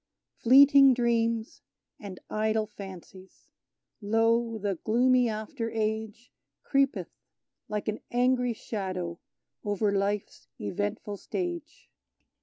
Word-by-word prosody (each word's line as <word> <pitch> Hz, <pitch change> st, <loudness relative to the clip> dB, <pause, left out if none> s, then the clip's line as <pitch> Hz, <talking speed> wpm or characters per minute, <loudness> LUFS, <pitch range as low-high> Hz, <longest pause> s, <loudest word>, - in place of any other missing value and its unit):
Fleeting 275 Hz, +1 st, +7 dB
dreams 230 Hz, -2 st, 0 dB, 0.4 s
and 195 Hz, -3 st, -9 dB
idle 220 Hz, 0 st, 0 dB
fancies! 190 Hz, -2 st, -12 dB, 0.5 s
Lo, 225 Hz, +2 st, +1 dB
the 200 Hz, -4 st, -3 dB
gloomy 245 Hz, +2 st, +3 dB
after 225 Hz, +2 st, -4 dB
Age 220 Hz, +1 st, -3 dB, 0.3 s
Creepeth, 275 Hz, -1 st, 0 dB, 0.6 s
like 210 Hz, -1 st, -3 dB
an 215 Hz, 0 st, -2 dB
angry 250 Hz, 0 st, +2 dB
shadow, 185 Hz, -6 st, -5 dB, 0.4 s
over 205 Hz, 0 st, 0 dB
life's 200 Hz, +1 st, -2 dB
eventful 205 Hz, -, -3 dB
stage! 340 Hz, -, -5 dB
220 Hz, 90 wpm, -28 LUFS, 205-245 Hz, 0.6 s, Fleeting